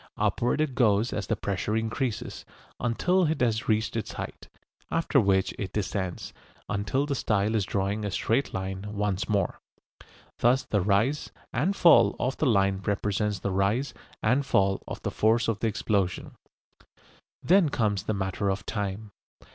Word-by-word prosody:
Upward 120 +5 +1
it 155 -4 0
goes 115 -2 +2
as 100 -3 -3
the - - +1
pressure 100 +2 -2
increases, 115 +1 -3 0.4
until 180 +10 +2
it 155 -2 -1
has 115 -3 0
reached 110 0 +1
its 115 - -3
height, - - -7 0.4
after 165 -3 +2
which 95 -4 +2
it 95 -3 -4
descends, 95 -3 -3 0.3
until 105 +8 -1
the 145 - -2
style 110 -4 0
is 105 -4 +1
drawing 100 +2 -1
a 105 - -1
straight 115 +7 0
line 95 0 -4
once 100 -2 -1
more. 100 -3 0 0.8
Thus 125 +3 +3
the 105 - 0
rise 110 +10 +1 0.2
and 165 +11 +1
fall 120 - +6
of 130 +2 -1
the 155 - +1
line 100 -4 +2
represents 105 +1 -1
the 100 - -1
rise 100 +8 0 0.3
and 135 +3 +3
fall 100 -7 +2
of - - -7
the - - -2
force 115 +2 +2
of 110 -3 -1
the 115 - 0
explosion. 100 -4 -1 1.1
Then 180 -3 +4
comes 105 -7 0
the 110 - -2
matter 95 +1 -1
of 95 +1 -2
time. 105 0 -4
105 Hz, 160 wpm, -27 LUFS, 100-125 Hz, 1.1 s, fall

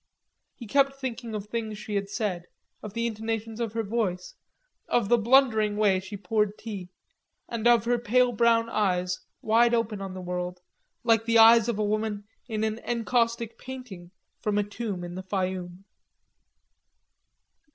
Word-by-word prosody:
He 240 - -9
kept 275 +4 +2
thinking 245 -4 -5
of 205 -1 -4
things 215 -1 -4
she 210 0 -7
had 200 -1 -1
said, 190 -6 -3 0.3
of 210 0 -8
the 230 0 0
intonations 225 0 -3
of 230 -3 -2
her 225 0 -1
voice, 200 -4 -2 0.5
of 235 -4 +1
the 240 - +5
blundering 220 -3 +4
way 200 -3 +3
she 190 +2 -8
poured 210 0 0
tea, 200 -5 -7 0.6
and 235 0 -1
of 235 -3 +5
her 240 0 +2
pale 245 +2 +3
brown 230 0 +3
eyes 185 -5 0 0.2
wide 235 +2 +4
open 220 -3 -1
on 190 -1 -6
the - - -6
world, 180 0 -4 0.4
like 225 -1 +3
the 230 0 +3
eyes 225 0 +8
of 230 - -1
a 215 - 0
woman 210 0 -1 0.2
in 220 -2 -2
an 220 +1 -1
encaustic 230 -1 -1
painting 250 -10 -9 0.3
from 210 -1 0
a 205 - +3
tomb 205 -3 -5
in 175 0 -6
the 185 - -5
Fayoum. 185 -1 -3
220 Hz, 160 wpm, -27 LUFS, 200-235 Hz, 0.6 s, eyes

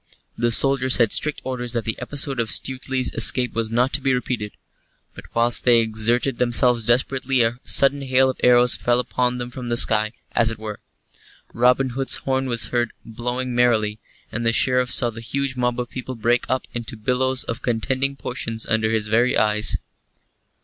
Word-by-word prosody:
The 120 - 0
soldiers 130 +1 +3
had 115 -4 +2
strict 150 -1 +1
orders 125 -2 -4
that 115 -1 -2
the 110 - -2
episode 135 0 -2
of 115 -2 -1
Stuteley's 130 +1 -2
escape 125 -1 +3
was 115 -1 -2
not 120 +4 0
to 140 - +1
be 130 -1 +1
repeated. 120 -4 -4 0.6
But - - -12
whilst 120 0 +2
they 120 -2 +5
exerted 115 +3 0
themselves 120 -1 +2
desperately 130 +1 +1
a 115 +2 -2
sudden 140 +1 +3
hail 130 -1 +2
of 130 - -4
arrows 125 0 +5
fell 120 0 0
upon 125 0 -1
them 120 0 -6
from 125 0 -8
the 120 - -1
sky, 110 -1 +3 0.2
as 115 -1 +3
it 115 - -6
were. 105 -1 -7 0.7
Robin 125 +2 +2
Hood's 135 +2 0
horn 130 0 -2
was 115 -3 -2
heard 120 -2 -1
blowing 125 +2 -4
merrily, 110 -3 +1 0.3
and 115 - -4
the 115 0 +2
Sheriff 125 0 +2
saw 120 -3 +3
the 115 +1 -9
huge 135 +3 -3
mob 125 -1 -1
of 120 -1 -5
people 130 0 -6
break 120 +2 0
up 130 +1 -1
into 115 -1 -5
billows 130 +4 0
of 115 - -6
contending 130 +4 -2
portions 115 -4 -5
under 110 -1 0
his 110 -1 0
very 115 +4 +1
eyes. 105 0 +2
120 Hz, 185 wpm, -21 LUFS, 115-130 Hz, 0.7 s, they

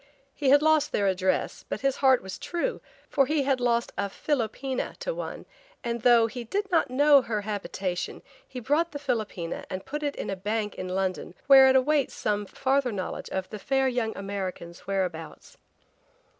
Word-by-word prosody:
He 280 -3 0
had 285 +2 +6
lost 315 -1 +3
their 205 - +1
address 190 -1 0
but - - -3
his 275 0 +1
heart 265 -4 +4
was 190 -1 -7
true, 350 +9 -2 0.3
for 275 -3 +2
he 300 -2 +1
had 270 -1 +1
lost 235 -1 +1
a 200 0 0
philopoena 260 +2 -2
to - - -3
one - - -6 0.4
and 235 -1 -2
though 235 -1 +6
he 240 +2 -5
did 395 - -3
not 335 - +3
know 285 +2 +6
her 220 -4 -2
habitation 195 -3 -4 0.2
he 255 - -7
bought 300 +8 0
the - - -3
philopoena 220 -11 -3
and 190 0 -5
put 295 +1 -4
it 290 -1 -2
in - - -4
a - - -2
bank 210 +2 -2
in 185 - -6
London 185 0 -2
where 270 -1 +8
it 260 - +4
awaits 275 +1 +2
some 205 -1 -1
farther 270 +1 0
knowledge 190 -3 -5
of 190 -1 -3
the 210 - -6
fair 270 +4 +1
young 240 -3 -1
American's 190 -3 -6
whereabouts. 180 -5 -4
240 Hz, 185 wpm, -27 LUFS, 195-275 Hz, 0.4 s, where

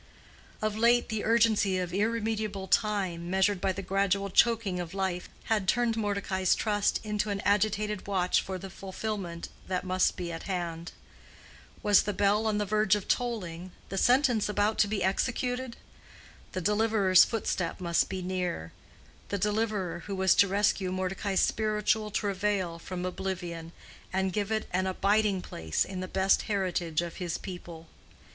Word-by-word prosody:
Of 215 -1 0
late 235 +2 +3
the 220 -2 -2
urgency 220 -4 +3
of 180 -1 -3
irremediable 215 -1 -1
time, 185 -5 0
measured 190 +1 +2
by 195 - +1
the 195 +1 -5
gradual 195 0 0
choking 220 -4 +3
of 175 +1 -5
life, 190 -2 -2
had 210 -4 0
turned 240 0 +2
Mordecai's 200 -3 0
trust 205 -2 +1
into 210 0 -1
an 200 -1 -1
agitated 210 0 0
watch 185 -3 +2
for 190 -1 -5
the 190 +1 -8
fulfillment 190 -3 -5 0.2
that 185 -1 -1
must 185 0 +1
be 175 -2 -4
at 165 - -7
hand. 170 -2 -3 0.9
Was 205 -2 +6
the 205 - -2
bell 205 +3 +2
on 215 -1 +1
the 210 - 0
verge 210 0 +3
of 205 - -5
tolling, 185 -8 -2 0.2
the 195 - -4
sentence 245 -3 +3
about 210 +1 +1
to 210 - +5
be 200 -2 -1
executed? 245 +5 -1 0.8
The 185 - -2
deliverer's 210 -1 +4
footstep 190 -7 -2
must 170 -2 +1
be 185 -1 -4
near—the 180 - -5
deliverer 210 -3 -1
who 200 - -3
was 190 -1 +4
to 200 - +5
rescue 195 -1 +1
Mordecai's 190 +1 -1
spiritual 215 0 +1
travail 200 -4 -1
from 180 +1 -5
oblivion, 175 -3 -4 0.4
and 190 0 0
give 205 +1 -1
it 215 0 -1
an 185 +1 +1
abiding 200 0 +1
place 80 -1 -1
in 190 -1 -6
the 185 - -4
best 190 +1 +2
heritage 180 -5 0
of 170 -1 -7
his 175 -2 -3
people. 170 -3 -9
195 Hz, 155 wpm, -29 LUFS, 185-210 Hz, 0.9 s, Was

